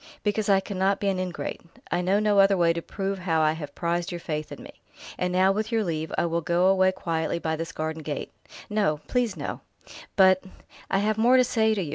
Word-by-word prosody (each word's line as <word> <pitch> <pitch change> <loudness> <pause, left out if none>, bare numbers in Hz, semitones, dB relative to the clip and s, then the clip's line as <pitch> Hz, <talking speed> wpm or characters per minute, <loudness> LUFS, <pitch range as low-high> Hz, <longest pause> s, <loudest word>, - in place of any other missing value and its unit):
"Because 210 0 0
I 195 -1 +5
cannot 195 0 0
be 200 - 0
an 190 -1 -1
ingrate. 185 -1 -4 0.3
I 180 - +1
know 190 +3 +2
no 210 -1 +3
other 195 0 +5
way 170 -1 +3
to 170 - -4
prove 195 +2 -4
how 170 -3 0
I 155 0 +4
have 150 -3 -7
prized 170 +1 -1
your 175 - -4
faith 155 -2 -4
in - - -9
me.... - - -11 0.4
And 180 0 -1
now, 185 +1 +4
with 215 +3 -2
your 225 -1 +1
leave, 160 -3 -3
I - - +2
will 170 0 -1
go 175 +2 +1
away 190 0 +4
quietly 165 -3 -2
by 160 -1 -2
this 165 +1 -5
garden 160 0 -4
gate 150 -2 -5 0.2
" - - -12
"No 200 -8 +1
please, 245 -5 0
no!" - - -5 0.5
"But 190 -1 +5 0.2
" - - -25
"I 195 - +2
have 215 +2 0
more 245 +3 +5
to 255 - +6
say 220 -2 +2
to 195 - -1
you. 155 - -6
185 Hz, 240 wpm, -26 LUFS, 165-200 Hz, 0.5 s, to